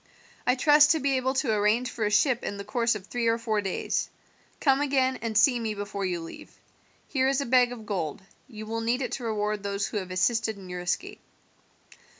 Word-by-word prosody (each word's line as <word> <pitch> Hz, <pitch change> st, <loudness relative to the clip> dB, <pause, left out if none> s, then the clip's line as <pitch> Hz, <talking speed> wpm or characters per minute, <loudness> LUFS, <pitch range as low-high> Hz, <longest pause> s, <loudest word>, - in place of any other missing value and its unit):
I 250 Hz, -, +4 dB
trust 295 Hz, +2 st, +6 dB
to 320 Hz, -, -1 dB
be 275 Hz, -1 st, +1 dB
able 260 Hz, +1 st, -1 dB
to 265 Hz, -4 st, +1 dB
arrange 215 Hz, +4 st, +1 dB
for 220 Hz, -, -2 dB
a -, -, +1 dB
ship 240 Hz, +4 st, +3 dB
in 200 Hz, -, -4 dB
the 200 Hz, -, -6 dB
course 230 Hz, +2 st, 0 dB
of 200 Hz, -3 st, -7 dB
three 235 Hz, +2 st, -2 dB
or 230 Hz, 0 st, +3 dB
four 220 Hz, -2 st, -1 dB
days. 195 Hz, -2 st, -2 dB, 0.5 s
Come 275 Hz, -1 st, +3 dB
again 265 Hz, -2 st, +1 dB
and 225 Hz, -2 st, -1 dB
see 245 Hz, +3 st, +5 dB
me 220 Hz, -2 st, -3 dB
before 200 Hz, -1 st, -4 dB
you 175 Hz, -2 st, -2 dB
leave. 165 Hz, -, -10 dB, 0.6 s
Here 265 Hz, -2 st, +1 dB
is 270 Hz, 0 st, +1 dB
a 280 Hz, -, -1 dB
bag 245 Hz, 0 st, +4 dB
of 230 Hz, -3 st, -8 dB
gold; 185 Hz, -4 st, -3 dB, 0.2 s
you 215 Hz, -4 st, -9 dB
will 225 Hz, +1 st, -3 dB
need 240 Hz, +4 st, 0 dB
it -, -, -4 dB
to 255 Hz, -, -4 dB
reward 210 Hz, -2 st, -1 dB
those 200 Hz, 0 st, -2 dB
who -, -, -4 dB
have 185 Hz, -2 st, -4 dB
assisted 220 Hz, +4 st, 0 dB
in 190 Hz, -2 st, -11 dB
your 180 Hz, 0 st, -5 dB
escape." 345 Hz, -, -3 dB
230 Hz, 220 wpm, -27 LUFS, 205-260 Hz, 0.6 s, trust